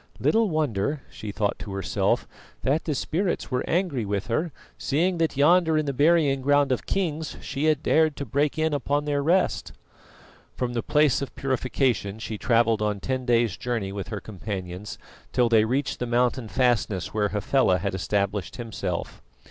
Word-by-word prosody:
"Little 225 -1 +3
wonder," 145 - -1
she 105 - -7
thought 100 0 -1
to 100 - -7
herself, 95 0 0 0.4
"that 145 +5 +1
the 150 - -1
spirits 175 +4 -1
were 125 0 0
angry 170 - 0
with 100 0 -2
her, 155 +8 0 0.2
seeing 170 +5 0
that 160 -4 0
yonder 160 +2 +4
in 155 - +1
the 140 - -1
burying 145 -1 +3
ground 145 0 +3
of 130 - -1
kings 160 -5 -2
she 140 +3 -3
had 155 -1 +2
dared 155 -2 +3
to 140 - -5
break 140 +6 0
in 155 -1 +1
upon 145 +1 0
their 145 -1 0
rest." 170 - +1 0.8
From 125 -1 -2
the 120 - -1
Place 150 0 +3
of 140 - -5
Purification 130 -5 0
she 110 -1 -6
travelled 115 -2 +2
on 105 -1 0
ten 130 +4 -3
days' 115 -4 +2
journey 115 -6 -2
with 100 -1 -5
her 105 - -4
companions 95 -2 -6 0.3
till 120 -2 +2
they 110 -2 +5
reached 135 +5 -1
the 125 - -2
mountain 120 0 +1
fastness 110 -7 0
where 105 -1 +1
Hafela 105 -1 +2
had 100 +2 -2
established 100 0 -1
himself. 115 -3 -4
130 Hz, 170 wpm, -25 LUFS, 105-150 Hz, 0.8 s, they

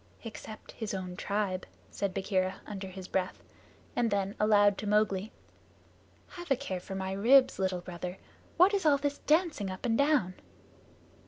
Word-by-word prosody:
"Except 220 -1 -9
his 215 -3 -4
own 185 -1 -5
tribe," 200 -1 -2 0.2
said 200 -1 -2
Bagheera, 185 -1 0
under 195 -2 -6
his 185 0 -8
breath; 185 -1 -2 0.5
and 240 -1 +2
then 200 -1 0
aloud 205 -1 +5
to 210 - -4
Mowgli, 210 -1 +1 1.0
"Have 350 -2 -9
a 270 - +4
care 235 -9 -4
for 190 +2 -7
my 190 0 -3
ribs, 240 +7 +5
Little 185 -2 0
Brother! 180 +1 -6 0.4
What 365 +4 +6
is 395 -2 +1
all 295 -3 +5
this 285 0 -2
dancing 310 - +1
up 185 +4 -6
and 230 -2 +2
down?" 280 -11 +3
205 Hz, 160 wpm, -30 LUFS, 190-245 Hz, 1.0 s, What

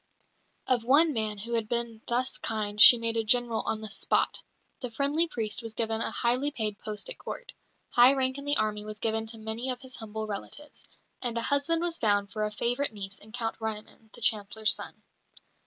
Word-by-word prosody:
Of 245 -3 0
one 295 +6 +3
man 215 -3 -3
who 230 +4 -6
had 225 -2 -1
been 235 -2 -2
thus 250 +2 -1
kind 210 -1 -1
she 240 - +12
made 230 0 0
a 225 - +1
General 235 0 +3
on 220 - -2
the 215 -2 -6
spot; - - 0 0.4
the 250 - -5
friendly 285 +8 0
priest 225 -8 -4
was 225 -1 -9
given 225 0 0
a - - +1
highly 250 +4 0
paid 220 -6 -3
post 210 -1 -5
at - - -5
Court; - - -8 0.4
high 245 +2 +6
rank 260 0 -1
in 280 - -10
the 290 +1 +3
army 210 -1 -2
was 215 0 -9
given 220 0 -2
to 225 +1 -6
many 220 +3 -3
of 250 -1 -4
his 260 -1 -7
humble 220 -1 -6
relatives; 215 +8 -6 0.3
and 240 -2 -2
a - - 0
husband 305 +5 0
was 340 -1 -2
found 205 -2 0
for 215 - -3
a 210 - -4
favourite 240 +4 0
niece 195 -1 -7
in 215 - -16
Count 225 -1 -4
Ryoumin, 220 0 -7
the - - -9
Chancellor's 215 -2 +5
son. - - -7
225 Hz, 205 wpm, -27 LUFS, 215-255 Hz, 0.4 s, she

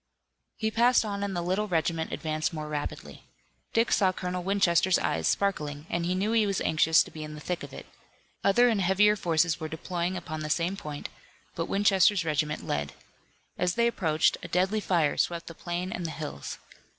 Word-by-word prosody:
He 220 -1 -1
passed 235 +1 +4
on 200 -1 -3
and 200 -2 -3
the 175 - -1
little 190 +4 0
regiment 165 -2 -1
advanced 155 0 -2
more 155 -1 -5
rapidly. 150 -1 -6 0.5
Dick 230 +1 +2
saw 190 -3 +4
Colonel 180 0 -4
Winchester's 185 -1 +3
eyes 80 -1 -1
sparkling 150 -7 -1
and 170 0 -1
he 180 - 0
knew 200 +4 0
he 225 -2 +3
was 195 -2 0
anxious 160 +1 +4
to - - -13
be 155 - -7
in 150 0 -7
the - - -8
thick 175 +3 -3
of - - -8
it. - - -9 0.6
Other 240 +5 +5
and 220 -4 +2
heavier 200 +3 +4
forces 165 -3 +1
were 160 - -4
deploying 175 +3 -3
upon 155 -3 -6
the 155 0 -4
same 170 +4 0
point, 150 -7 -6 0.4
but - - -3
Winchester's 195 -2 +3
regiment 150 -1 -1
led. 75 -1 -2 0.7
As 180 0 +1
they 235 - +3
approached 160 -9 +2
a - - -7
deadly 190 +4 +1
fire 170 -7 +1
swept 170 -1 0
the 165 - -8
plain 175 +2 -4
and 180 - -4
the - - -5
hills. 70 - -6
175 Hz, 195 wpm, -28 LUFS, 155-195 Hz, 0.7 s, Other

